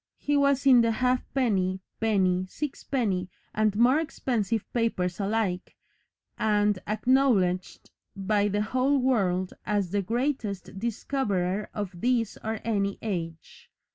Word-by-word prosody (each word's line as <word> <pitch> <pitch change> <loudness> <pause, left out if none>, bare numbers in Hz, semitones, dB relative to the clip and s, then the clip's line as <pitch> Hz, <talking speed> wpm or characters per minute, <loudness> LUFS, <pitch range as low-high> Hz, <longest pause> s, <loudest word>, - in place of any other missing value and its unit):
He 290 - -1
was 280 -1 +2
in 255 -3 +7
the 230 - +2
halfpenny, 235 -6 0 0.2
penny, 185 -4 +1
six 295 +4 -5
penny, 195 -9 -1 0.2
and 215 -1 +1
more 245 +7 +4
expensive 230 - -1
papers 200 -7 -1
alike, 200 -3 -1 0.6
and 210 -2 +2
acknowledged 215 -5 +1 0.2
by 205 +1 +1
the 205 +1 0
whole 260 +5 +1
world 195 -9 +1
as 205 -4 -1
"the 205 0 +1
Greatest 225 -4 -2
Discoverer 210 -4 -1
of 205 -3 -3
This 235 -3 +1
or 220 0 -3
Any 200 -3 0
Age." 165 -6 -5
215 Hz, 120 wpm, -27 LUFS, 190-250 Hz, 0.6 s, in